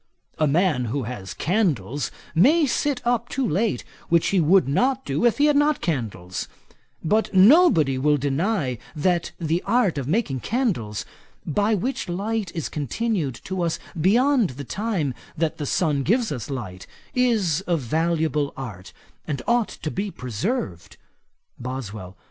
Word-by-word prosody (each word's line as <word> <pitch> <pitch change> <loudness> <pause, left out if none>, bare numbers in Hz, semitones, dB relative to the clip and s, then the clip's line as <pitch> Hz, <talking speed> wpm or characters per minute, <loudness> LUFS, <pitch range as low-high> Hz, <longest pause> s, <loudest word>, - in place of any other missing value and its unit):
A 155 - +3
man 150 -4 +2
who 130 +4 -2
has 110 -5 -6
candles 150 - 0 0.2
may 295 - +5
sit 270 -1 -1
up 240 -1 +1
too 270 -3 -1
late, 210 +5 0 0.3
which 170 -1 +3
he 195 - +2
would 175 +2 +4
not 260 - +1
do - - 0
if 235 - +3
he 290 - +4
had 295 -1 +4
not 295 0 +3
candles; 105 - -3 0.6
but 215 +7 +1
nobody 190 - +6
will 150 +2 +3
deny 145 - -1 0.2
that 170 +2 +1
the 165 +1 0
art 205 - +2
of 130 - -4
making 155 - 0
candles, 170 - -1 0.4
by 205 +7 +1
which 245 +1 -3
light 200 +1 -2
is 165 - -2
continued 155 - -2
to 190 -1 -3
us 170 -2 0 0.2
beyond 230 - +3
the 140 - -5
time 180 - -2 0.2
that 160 0 -1
the 145 - -3
sun 150 -4 +1
gives 225 - +1
us 125 -4 -5
light, 105 -9 -6 0.3
is 210 -10 +2
a 175 -2 +2
valuable 155 +1 0
art, 105 -8 -8 0.3
and 145 - -3
ought 235 -2 +2
to 155 - -6
be 200 +2 -2
preserved.' 125 - -4 0.6
BOSWELL. 110 -7 -6
170 Hz, 150 wpm, -24 LUFS, 135-225 Hz, 0.6 s, nobody